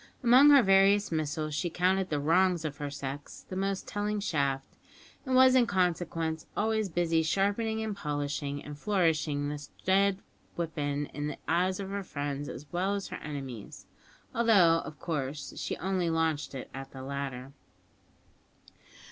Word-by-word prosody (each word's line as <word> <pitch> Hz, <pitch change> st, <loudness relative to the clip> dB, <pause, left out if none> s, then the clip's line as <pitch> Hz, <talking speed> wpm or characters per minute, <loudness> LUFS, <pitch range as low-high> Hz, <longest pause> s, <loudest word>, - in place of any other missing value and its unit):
Among 255 Hz, +4 st, +7 dB
her 280 Hz, -3 st, +8 dB
various 195 Hz, +1 st, +4 dB
missiles 155 Hz, -1 st, -2 dB
she 170 Hz, +4 st, -1 dB
counted 185 Hz, +2 st, +1 dB
the 150 Hz, -, 0 dB
"wrongs 170 Hz, +2 st, +2 dB
of 145 Hz, -2 st, -4 dB
her 145 Hz, -1 st, -4 dB
sex" 140 Hz, 0 st, -7 dB
the 185 Hz, -, -6 dB
most 195 Hz, 0 st, -2 dB
telling 210 Hz, 0 st, -2 dB
shaft, 140 Hz, -8 st, -1 dB, 0.5 s
and 260 Hz, -, +1 dB
was 260 Hz, 0 st, +7 dB
in 250 Hz, -2 st, +5 dB
consequence 165 Hz, -4 st, -1 dB
always 220 Hz, -1 st, +1 dB
busy 165 Hz, -1 st, +1 dB
sharpening 205 Hz, +6 st, 0 dB
and 215 Hz, -2 st, -3 dB
polishing 145 Hz, -4 st, -3 dB
and 150 Hz, -, -7 dB
flourishing 155 Hz, -7 st, +1 dB
this 145 Hz, -1 st, -6 dB, 0.2 s
dread 195 Hz, +1 st, +3 dB, 0.4 s
weapon 145 Hz, -3 st, -2 dB
in 145 Hz, 0 st, -3 dB
the 150 Hz, -, -5 dB
eyes 180 Hz, +4 st, +1 dB
of 195 Hz, -1 st, -5 dB
her 200 Hz, 0 st, -2 dB
friends 145 Hz, -4 st, -4 dB
as 140 Hz, -, -8 dB
well 190 Hz, +3 st, 0 dB
as 200 Hz, -, -4 dB
her -, -, -5 dB
enemies, 135 Hz, -7 st, -7 dB, 0.5 s
although, 195 Hz, -8 st, +5 dB
of 150 Hz, -, -9 dB
course, 145 Hz, -3 st, -4 dB
she -, -, -3 dB
only 185 Hz, -1 st, 0 dB
launched 160 Hz, -3 st, 0 dB
it 130 Hz, -, -7 dB
at 135 Hz, 0 st, -7 dB
the 130 Hz, -1 st, -8 dB
latter. 135 Hz, -1 st, -5 dB
165 Hz, 155 wpm, -30 LUFS, 145-195 Hz, 0.5 s, her